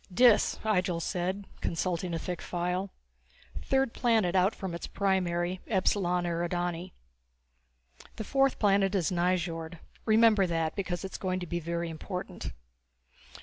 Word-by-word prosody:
V 180 - -14
"Dis," 245 -2 +5
Ihjel 185 -5 +1
said, 185 +4 -2 0.2
consulting 175 +1 -1
a - - 0
thick 175 +1 -4
file, 180 +2 -2 0.7
"third 270 -3 +1
planet 225 -8 +2
out 190 +3 +3
from 190 -3 -5
its 170 - -5
primary, 185 -2 0
Epsilon 185 -3 +1
Eridani. 175 +1 -2 1.2
The 220 - -4
fourth 270 +3 +2
planet 200 -1 +3
is 185 -1 +1
Nyjord 175 -2 -1 0.3
remember 220 -3 +5
that, 165 -2 -1
because 185 -3 -3
it 190 - -6
is - - -6
going 185 -1 -1
to 180 - -4
be 175 0 -2
very 170 +1 -2
important. 180 +3 -6
180 Hz, 140 wpm, -29 LUFS, 175-200 Hz, 1.2 s, Dis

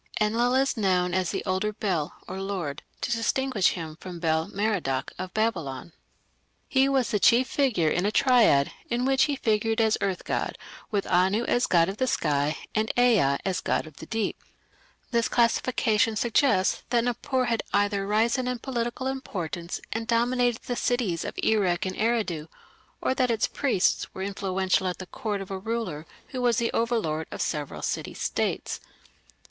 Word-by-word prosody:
Enlil 230 +4 +2
is 270 +1 +2
known 180 -4 +1
as 185 -2 +1
the - - -3
"older 190 +2 0
Bel" 180 -7 -2
(lord), 185 -6 -4 0.2
to - - -2
distinguish 230 -2 +1
him 160 -3 -6
from 180 -2 -8
Bel 160 -1 +1
Merodach 185 -11 -1
of 185 0 -4
Babylon. 170 - -2 0.7
He 270 0 +3
was 265 -4 +1
the 210 - +1
chief 245 +5 +5
figure 235 - +1
in 175 - +1
a - - +1
triad 225 - +4 0.2
in 240 +1 0
which 270 0 +4
he 290 - -1
figured 225 -2 +1
as 220 -1 +3
earth 195 -2 -1
god, - - -2 0.3
with 200 -2 -1
Anu 190 +5 +2
as 245 +1 +1
god 170 -2 +4
of 195 +2 -4
the 260 - +1
sky 145 - +1 0.2
and 215 0 +1
Ea 215 - +4
as 185 -2 -1
god - - 0
of 155 -2 -14
the 160 - -10
deep. 220 -2 -2 0.7
This 235 -1 +2
classification 230 -2 +2
suggests 220 -3 +2
that 235 -1 +2
Nippur 250 +1 0
had 230 -2 0
either 205 -1 +1
risen 230 +5 +2
in 250 0 -1
political 240 0 -3
importance 175 - -4
and 225 0 -3
dominated 240 +1 +1
the 245 - -3
cities 235 -10 0
of - - -6
Erech 195 -6 +2
and 185 0 -3
Eridu, 215 -9 0 0.5
or - - +1
that 255 -1 +1
its 225 -2 +2
priests 255 -10 +1
were 190 - -4
influential 190 -1 0
at 180 - -2
the 185 - -7
court 205 +1 -4
of 195 - -8
a 190 - -3
ruler 190 -8 -3 0.2
who 255 -3 -4
was 240 -2 +3
the 235 -1 +1
overlord 215 -10 0
of - - -7
several 150 -3 -3
city - - -3
states. - - -2
210 Hz, 170 wpm, -26 LUFS, 180-240 Hz, 0.7 s, chief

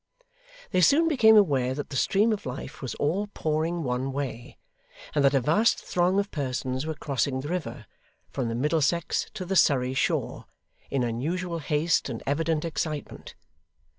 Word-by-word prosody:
They 185 - +2
soon 295 - +5
became 225 -8 +6
aware 135 -10 +3
that 145 +1 -6
the - - -5
stream 210 - +2
of 205 - -5
life 125 - -7
was 130 -4 -4
all 185 +8 -1
pouring 160 +2 -1
one 130 +1 -2
way, 135 -4 -5 0.6
and 145 - +2
that 140 0 +4
a - - +5
vast 165 - +3
throng 180 +2 0
of 200 0 -2
persons 130 -1 -3
were 160 - -3
crossing 135 -2 -1
the 145 - -6
river 165 -9 -4 0.5
from 130 -3 -2
the 115 - -2
Middlesex 155 +4 0
to 190 -4 -5
the 190 +2 -2
Surrey 130 -7 +3
shore, 130 - -1 0.4
in 135 -2 0
unusual 165 +9 -2
haste 150 -1 0
and 115 -3 -6
evident 160 +2 0
excitement. 155 -2 -5
150 Hz, 165 wpm, -26 LUFS, 130-175 Hz, 0.6 s, became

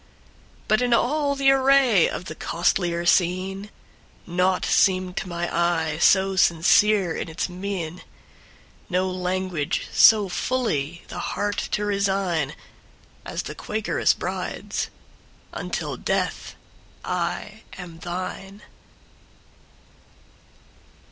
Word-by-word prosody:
But 215 +2 +3
in 245 -1 +3
all 285 +4 +1
the 275 0 +4
array 265 -7 +4
of 175 - -6
the - - -6
costlier 175 0 0
scene, 185 +3 +1 0.6
Naught 180 +1 +1
seemed 185 -1 +2
to 185 - -3
my 175 0 -2
eye 165 -2 0
so 190 +1 +4
sincere 185 +2 +4
in - - -4
its 160 - -2
mien, 180 -2 -5 0.9
No 185 0 +1
language 185 -4 -2
so 215 -3 +6
fully 175 - -2
the - - -6
heart 205 0 -2 0.2
to 210 - 0
resign, 190 -7 0 0.7
As - - -3
the - - -6
Quakeress 215 +1 0
bride's—"Until - - -6
death - - -2 0.5
I 180 +5 -3 0.2
am 175 -3 -9
thine!" 185 +3 -6
185 Hz, 100 wpm, -24 LUFS, 175-205 Hz, 0.9 s, so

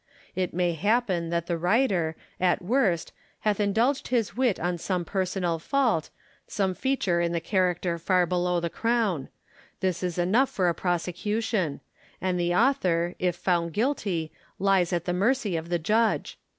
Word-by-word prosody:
It 185 -2 -1
may 175 0 0
happen 190 -2 +1
that 170 0 -1
the 170 -1 -2
writer, 180 -4 +2 0.2
at 180 0 +2
Avorst, 190 -3 +1 0.3
hath 210 -1 +1
indulged 225 +7 +1
his 235 -4 0
wit 245 -6 +1
on 175 0 -1
some 180 0 -2
personal 180 -2 -1
fault, 235 - +1 0.4
some 190 -2 0
feature 190 -8 0
in 170 0 0
the 170 - +1
character 175 -1 0
far 180 +1 +2
below 180 0 0
the 170 -1 -3
crown: 225 - 0 0.5
this 185 -3 -1
is 180 -2 -2
enough 210 +10 +3
for 185 -2 0
a - - +1
prosecution; 180 +1 -1 0.4
and 185 -1 -1
the 175 0 +1
author, 180 -9 +2
if 180 -2 0
found 170 -2 0
guilty, 200 - -1 0.3
lies 190 -2 +2
at 175 -1 -1
the 180 - 0
mei'cy 205 +1 +1
of 165 +1 -4
the 175 - +1
judge. 215 +7 0
180 Hz, 160 wpm, -26 LUFS, 170-215 Hz, 0.5 s, enough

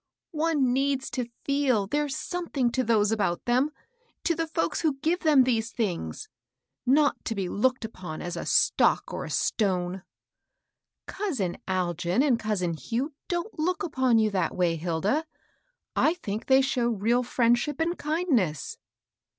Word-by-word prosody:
" - - -65
One 305 -5 +1
needs 270 0 0
to 250 -2 -3 0.2
feel 275 -7 +2
they're 295 +7 -1
something 305 -4 -2
to 255 +1 0
those 215 -3 +2
about 200 -6 0
them, 250 +4 +2 0.3
— 475 -1 -41
to 340 - +2
the 330 0 -2
folks 325 +1 -1
who 310 -4 +1
give 320 +6 0
them 300 -6 +5
these 230 -3 0
things; 220 - -3 0.6
not 290 +3 +3
to 225 - -2
be 195 -2 -2
looked 250 +5 0
upon 180 -7 -7
as 175 0 -5
a 170 - -4
stoc^ - - +2
or - - -4
a - - -7
stone." 185 -3 0
^^ - - -14 1.0
Cousin 265 - -2
Algin 180 - 0
and 245 -4 +3
cousin 200 -6 -1
Hugh 245 - -3
don't 350 +2 -3
look 360 +4 0
upon 260 -7 +2
you 215 -1 +3
that 185 -4 -1
way, 175 -2 +2
Hilda; 175 - 0 0.7
I 320 - +3
think 215 - -5
they 265 0 +6
show 250 -3 +1
real 230 +3 +1
friendship 240 +3 +1
and 335 +2 0
kindness." 290 - -1
250 Hz, 160 wpm, -27 LUFS, 200-300 Hz, 1.0 s, they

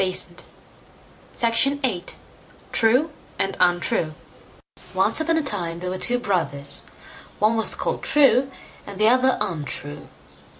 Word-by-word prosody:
TALES 185 -1 +3
FROM 175 - -17 1.0
THE 230 +3 +4
NORSE 190 -9 -2 0.6
TRUE 255 +8 +2 0.3
AND 195 - -1
UNTRUE 175 -3 +1 0.8
Once - - +2
on 325 +1 +1
a 320 - 0
time 170 -11 -3
there 180 +1 -5
were 185 - -4
two 245 - +3
brothers; 175 - -1 0.6
one 215 +2 +2
was 225 - +4
called - - -3
True, 275 -3 +3 0.4
and 200 -1 -8
the 215 - +4
other 255 +2 +3
Untrue. 145 -2 -5
215 Hz, 130 wpm, -22 LUFS, 175-255 Hz, 1.0 s, THE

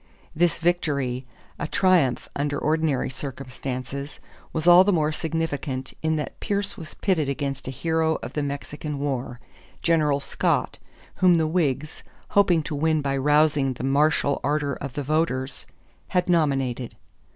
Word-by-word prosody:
This 170 +2 +2
victory, 140 -7 0 0.3
a - - -2
triumph 175 -10 +2
under 145 0 -1
ordinary 155 -4 0
circumstances, 135 +1 -6 0.3
was 160 -1 -3
all 175 +1 +9
the 205 - +2
more 155 -4 +2
significant 150 -5 -3
in 160 0 +1
that 150 -2 -4
Pierce 200 0 -1
was 160 -2 -9
pitted 165 -8 0
against 140 -1 -3
a - - -2
hero 160 +4 0
of 125 +4 -6
the 150 - -1
Mexican 145 +1 -4
War, 130 -4 -3 0.4
General 150 -4 +3
Scott, 140 - -1 0.4
whom 180 -1 +5
the 160 -1 +2
Whigs, 150 -3 -1 0.3
hoping 180 -5 +4
to 150 - -5
win 155 +1 +1
by 140 -1 0
rousing 145 0 +3
the 125 - -8
martial 140 +1 +2
ardor 145 0 0
of 140 -3 -6
the 145 - -3
voters, 140 -3 -1 0.4
had 180 - 0
nominated. 135 -8 +1
150 Hz, 145 wpm, -25 LUFS, 135-160 Hz, 0.4 s, all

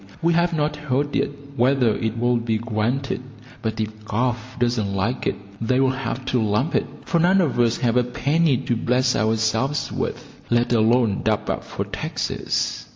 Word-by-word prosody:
We 170 +1 +2
have 170 +1 +3
not 150 -2 0
heard 145 -1 -1
yet - - +1 0.3
whether 125 -3 +3
it 110 0 -2
will 120 +1 +2
be 115 -1 0
granted, 115 +4 -1 0.4
but 110 0 -3
if 110 0 -3
Gov. 120 +3 +1 0.2
doesn't 120 -5 0
like 105 +6 -1
it, - - 0 0.3
they'll 130 +3 +2
have 130 -1 -4
to 125 - +2
lump 110 +7 +1
it, - - +1 0.2
for 170 - +1
none 180 +3 +4
of 155 -9 +1
us 120 -1 +3
have 120 0 +1
a 125 - +4
penny 140 +3 +1
to 120 0 -1
bless 125 +2 +1
ourselves 110 +6 +1
with, - - -5
let 120 +1 +2
alone 115 -2 +3
dub - - 0
up - - -3
for - - -4
taxes. - - -2
120 Hz, 175 wpm, -23 LUFS, 110-135 Hz, 0.4 s, none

